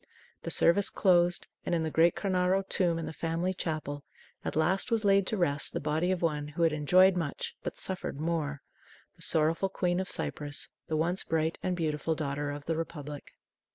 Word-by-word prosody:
The - - -5
service 195 +4 +4
closed, 175 -2 +3 0.2
and - - 0
in 165 - 0
the 160 - -2
great 165 +2 +4
Cornaro 190 0 +1
tomb 175 -3 +1
in 165 - -3
the - - -6
family 165 +3 -1
chapel, 155 -5 -3 0.4
at - - -3
last 175 +8 +2
was 225 -3 +1
laid 195 -1 +4
to 220 - 0
rest 145 -6 0
the - - -1
body 155 +4 0
of 185 -2 0
one 150 -3 0
who 160 +3 -2
had 165 -2 +3
enjoyed 180 +5 +5
much 165 -5 -3
but - - -5
suffered 185 -6 -4
more 155 -3 -2 0.5
the 170 - -21
sorrowful 165 +3 +2
Queen 180 -1 0
of 190 - -3
Cyprus, 145 -1 -2 0.2
the 155 - -1
once 175 +4 +1
bright 160 0 -1
and 185 - -1
beautiful 155 -1 -1
Daughter 145 -1 -2
of 145 0 -6
the 165 - -1
Republic. 150 -3 -6
165 Hz, 190 wpm, -30 LUFS, 150-180 Hz, 0.5 s, enjoyed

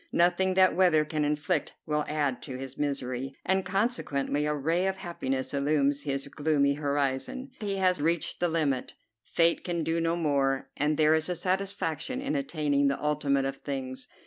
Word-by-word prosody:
Nothing 180 +2 +3
that 185 0 +5
weather 170 -4 +4
can 155 0 -1
inflict 150 +2 0
will 150 -1 0
add 145 -4 -1
to 130 -3 -6
his 135 0 -7
misery, 135 -2 -3
and 190 +1 +2
consequently 150 - 0
a 150 - 0
ray 165 +6 +1
of 190 - 0
happiness 135 -8 -3
illumines 140 0 +1
his 140 -1 -1
gloomy 145 -1 +1
horizon. 145 - -2
He 200 -2 -2
has 185 -4 +2
reached 165 +2 0
the 175 - +2
limit; 150 -6 -1 0.3
Fate 170 0 +2
can 170 -2 -2
do 165 +1 0
no 165 0 +1
more; 135 -4 0
and 150 +1 +1
there 155 0 +5
is 160 +2 +1
a 180 - -1
satisfaction 190 - -2
in 275 +2 -2
attaining 150 - +1
the 140 - 0
ultimate 145 -2 +1
of 135 0 -3
things. 130 -2 -5
150 Hz, 170 wpm, -28 LUFS, 140-175 Hz, 0.3 s, that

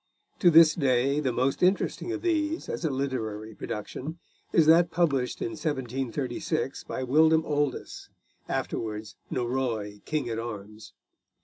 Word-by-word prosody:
To 180 - +6
this 160 -1 +8
day 135 -1 +2
the 135 -4 0
most 130 +3 0
interesting 190 - +1
of - - -4
these, 320 -1 0
as - - -4
a 160 - +1
literary 110 -6 -3
production, 130 +11 -6 0.3
is 165 - +5
that 165 +2 +6
published 140 -8 0
in - - -1
1736 135 +2 -3
by 130 - -4
William 160 +5 +4
Oldys, 145 -3 -2 0.4
afterwards 110 -1 -3 0.2
Norroy 120 -5 -2
King 150 -5 -1
at 115 -1 -2
Arms. 110 -2 -8
135 Hz, 130 wpm, -27 LUFS, 120-160 Hz, 0.4 s, this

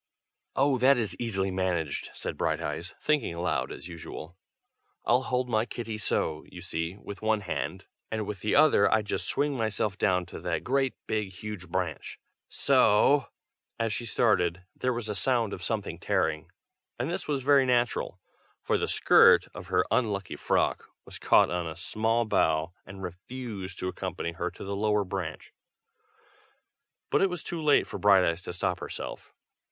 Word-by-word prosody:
"Oh! 135 -1 +3
that 135 +2 +5
is 110 -4 -1
easily 95 -5 -1
managed!" 90 -5 -1
said - - -4
Brighteyes, 85 +2 -2
thinking 150 - 0
aloud 85 +1 -1
as - - -8
usual. 85 0 -8 0.7
"I'll 125 +2 +4
hold 125 -1 -1
my 110 -2 +2
kitty 115 -2 -5
so, 80 -7 0
you 90 -1 -10
see, 85 +1 -3
with 100 -1 -9
one 110 -1 +1
hand, 90 - -4 0.2
and 110 -1 -2
with 100 -2 -5
the 105 - 0
other 145 -10 +5
I 110 -1 +3
just 105 - -2
swing 145 -1 0
myself 110 -3 -1
down 90 -3 +2
to 90 - -9
that 85 -2 -2
great 135 0 +1
big 105 -2 -1
huge 95 -2 -7
branch, 90 -2 -3 0.3
so 130 +7 +4 0.3
" - - -49
as 115 -1 0
she 120 - -3
started, 95 -6 +2
there 125 - 0
was 120 -2 -3
a 105 - -2
sound 115 0 +1
of - - -6
something - - -3
tearing, 80 0 0 0.5
and 120 +2 -2
this - - -4
was 140 -3 -1
very 140 -1 +5
natural, 120 -1 +1 0.4
for - - +1
the - - 0
skirt - - +6
of - - -9
her - - +2
unlucky 105 -5 0
frock - - 0 0.2
was - - -9
caught - - +5
on 90 -1 -1
a 80 - -5
small 115 +6 0
bough 80 -5 +1
and 95 +1 -9
refused 95 +1 -6
to 90 - -3
accompany 85 -2 -3
her 85 +1 -3
to - - -11
the 100 +1 -3
lower 105 0 +2
branch; 90 - -5 1.6
but - - +3
it 195 - +4
was 180 -3 -5
too 170 -2 -4
late 150 -2 +4
for - - -7
Brighteyes 90 -4 +4
to - - -5
stop 90 - -1
herself. - - -7
105 Hz, 170 wpm, -28 LUFS, 90-120 Hz, 1.6 s, skirt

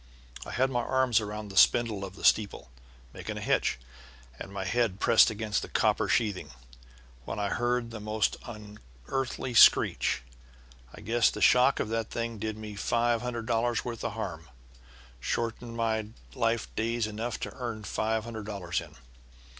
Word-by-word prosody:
I - - -6
had 130 +2 +1
my 120 - 0
arms 130 -2 +2
around 105 0 -6
the 100 - -9
spindle 115 -4 +4
of 95 -1 -7
the - - -12
steeple, 100 - +2 0.4
making - - -6
a - - -3
hitch, - - +1 0.6
and 95 - -8
my 100 -1 -4
head 100 0 0
pressed 115 - +6
against 110 -1 -2
the - - -7
copper - - +2
sheathing, 105 -5 0 0.8
when - - -5
I 100 -1 -1
heard 120 0 -1
a 110 - -6
most 105 0 0
unearthly 105 - -5
screech. 110 - +5 0.7
I - - -12
guess 115 +2 +3
the - - -6
shock 125 +2 +5
of - - -1
that 115 -1 -2
thing 115 -2 -4
did 110 0 -3
me 110 -1 -7
five 115 +3 +1
hundred 120 -2 -4
dollars' 120 0 0
worth 120 -2 -5
of 115 - -2
harm 90 -7 -6 0.7
shortened 115 - -3
my 110 -2 0 0.3
life 115 -3 -1
days 115 +1 0
enough 110 +2 -4
to - - -4
earn 115 -4 -5
five 110 +1 -1
hundred 110 -2 -7
dollars 95 -5 -2
in. 80 -2 -13
110 Hz, 165 wpm, -29 LUFS, 105-120 Hz, 0.8 s, pressed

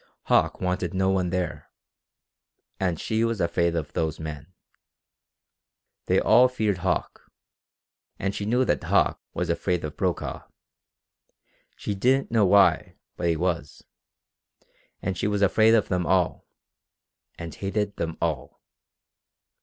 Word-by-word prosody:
Hauck - - +2
wanted 90 -1 -2
no 95 0 +2
one 95 -2 0
there. 90 -2 -3 1.1
And 90 -4 -1
she 110 0 0
was 115 -2 -1
afraid 85 0 +1
of 80 -3 -4
those 80 -2 -2
men. 80 +1 -7 1.6
They - - +3
all 120 +3 +6
feared 110 -7 -1
Hauck, 90 0 -3 0.9
and 100 0 -2
she 100 - -4
knew 125 +3 +2
that - - 0
Hauck - - +2
was - - -1
afraid 90 -1 -1
of 75 - -6
Brokaw. - - -3 1.3
She 105 - -4
didn't 130 +7 +1
know 110 -4 +4
why, 100 +1 +4 0.2
but 85 - -2
he 85 - +2
was. 85 -4 -3 1.2
And 95 0 -1
she 100 - -1
was 105 -1 0
afraid 110 +4 +5
of 110 - +2
them 90 -2 0
all, 90 -1 +1 0.9
and 85 -2 -7
hated 100 +1 -3
them 80 -1 -3
all. 75 -6 -3
95 Hz, 130 wpm, -25 LUFS, 85-105 Hz, 1.6 s, all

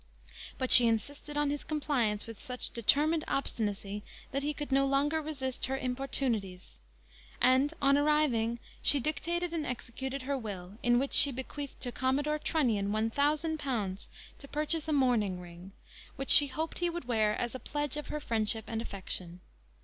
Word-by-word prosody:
But 260 -1 -1
she 240 -2 +8
insisted 285 +6 -2
on 295 -1 +1
his 290 - -3
compliance 260 -9 -1
with 225 -2 -10
such 250 -1 -1
determined 300 +7 +2
obstinacy, 210 -6 -2 0.3
that 275 - -1
he 290 +1 -1
could 295 -1 -6
no 275 +1 +3
longer 290 +3 +1
resist 270 -4 -2
her 265 0 -1
importunities; 250 -8 -2 0.6
and, 260 +3 +4
a 275 - +5
arriving, 285 -6 +2 0.2
she 285 - +4
dictated 335 +5 -1
and 325 -2 -1
executed 260 +1 -5
her 280 +2 -1
will, 205 -4 -7
in 240 0 +3
which 270 +2 -1
she 285 - +7
bequeathed 270 +2 -6
to 245 - -2
Commodore 285 +5 0
Trunnion 230 -12 0
one 220 +1 0
thousand 305 +4 +1
pounds, 215 -9 -3 0.3
to 280 - -11
purchase 305 +2 -1
a - - -1
mourning 235 -9 +2
ring, 175 +2 -11 0.4
which 270 -1 +1
she 290 - +10
hoped 315 +4 -4
he 350 0 +1
would 345 -4 -5
wear 215 -3 +1
as 240 - -3
a 260 - -5
pledge 295 0 -2
of 300 - -5
her 300 - -4
friendship 220 -4 -1
and 225 -1 -3
affection. 185 -4 -6
265 Hz, 170 wpm, -31 LUFS, 225-295 Hz, 0.6 s, she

